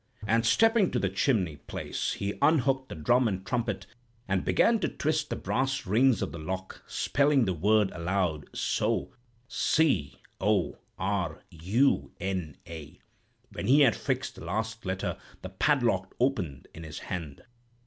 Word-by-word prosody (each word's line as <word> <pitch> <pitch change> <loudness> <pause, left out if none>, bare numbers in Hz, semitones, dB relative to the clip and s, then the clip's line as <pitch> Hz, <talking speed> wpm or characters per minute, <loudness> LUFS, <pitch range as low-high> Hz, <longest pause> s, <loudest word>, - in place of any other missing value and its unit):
And 115 +2 +2
stepping 225 - +4
to - - -1
the 100 -5 +1
chimney 95 - +1
place, 75 - -4
he 100 0 -3
unhooked 135 -3 +3
the - - -6
drum 120 +11 +3
and 95 -2 -3
trumpet, 115 -3 -2 0.4
and 95 -1 0
began 230 -1 +3
to - - 0
twist 155 0 -1
the - - -2
brass 130 -1 -1
rings 115 +3 +3
of - - -3
the 85 - -7
lock, 95 +4 -5
spelling 140 -3 +2
the 95 - 0
word 105 +4 +3
aloud, 85 -3 -1
so—'C 120 - -1 0.2
O 100 -1 +1 0.2
R 95 -1 -2
U 100 - +1
N 90 -6 -3
A.' 80 -3 -9 0.5
When - - -5
he 140 +4 +6
had 125 -7 +5
fixed - - -2
the - - -11
last 110 +4 -3
letter, 95 0 -2 0.2
the 95 - -5
padlock 100 -3 +1
opened 95 - -1
in 80 - -10
his 80 -2 -8
hand. 80 -6 -6
100 Hz, 150 wpm, -28 LUFS, 90-130 Hz, 0.5 s, he